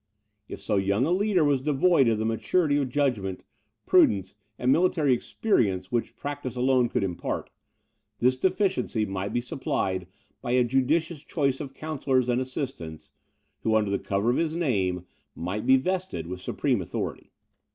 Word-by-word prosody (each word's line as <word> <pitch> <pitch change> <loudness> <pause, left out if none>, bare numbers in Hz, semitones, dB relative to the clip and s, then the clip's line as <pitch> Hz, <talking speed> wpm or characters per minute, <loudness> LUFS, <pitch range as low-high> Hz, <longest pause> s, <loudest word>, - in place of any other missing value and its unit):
If - - -7
so 105 - -1
young 100 +5 +2
a 165 - 0
leader 190 -2 +2
was 145 -3 +2
devoid 150 0 +3
of 115 -2 +2
the 110 - -1
maturity 145 +7 +1
of 140 -3 0
judgment, 120 -9 -1 0.4
prudence, 95 -2 +4 0.2
and 125 +1 +2
military 160 -4 +3
experience 105 - 0
which 120 -1 -1
practice 145 -3 -5
alone 125 -1 +2
could - - 0
impart, 90 -3 -3 0.7
this 125 +2 +3
deficiency 185 - 0
might 95 0 -3
be 120 - 0
supplied 95 - -2 0.3
by 120 - -2
a 125 0 +4
judicious 140 +6 +1
choice 140 -5 0
of 135 -3 -7
counsellors 135 -5 0
and 120 +1 +2
assistants, 130 - -6 0.5
who, 110 -1 +1
under 105 -2 +2
the 100 - 0
cover 100 +4 0
of - - 0
his 160 -1 0
name, 95 - 0 0.3
might 95 +5 -4
be 130 - +7
vested 185 - -2
with 90 +2 -6
supreme - - 0
authority. - - -5
130 Hz, 160 wpm, -26 LUFS, 105-145 Hz, 0.7 s, be